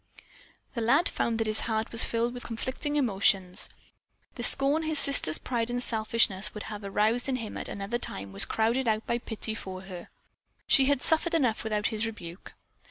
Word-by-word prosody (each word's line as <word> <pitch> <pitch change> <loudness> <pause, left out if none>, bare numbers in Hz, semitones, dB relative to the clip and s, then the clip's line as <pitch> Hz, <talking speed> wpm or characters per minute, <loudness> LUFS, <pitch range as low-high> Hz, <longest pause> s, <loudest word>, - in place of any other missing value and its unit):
The 235 - -4
lad 275 +9 +2
found 230 -1 -2
that 225 - -2
his 215 0 +2
heart 220 +1 -2
was 230 - +3
filled 235 +1 -2
with 245 - -8
conflicting 260 +5 -5
emotions. 195 -8 +1 0.6
The 240 - -8
scorn 275 +5 +6
his 315 -1 0
sister's 275 - +5
pride 235 -2 -3
and 245 +1 -3
selfishness 220 -3 0
would 210 - -7
have 210 -1 -8
aroused 215 +6 0
in 260 - -1
him 230 -4 -7
at - - -4
another 200 +4 -5
time 100 - -4
was 100 - +6
crowded 235 +3 -1
out 220 0 -1
by 235 - -2
pity 220 -1 -5
for 190 -4 -8
her. 185 -2 -11 0.6
She 270 - +3
had 280 -1 0
suffered 330 +1 +3
enough 250 -8 0
without 215 -1 -2
his 225 0 -2
rebuke. 180 -5 -11
225 Hz, 185 wpm, -27 LUFS, 210-250 Hz, 0.6 s, scorn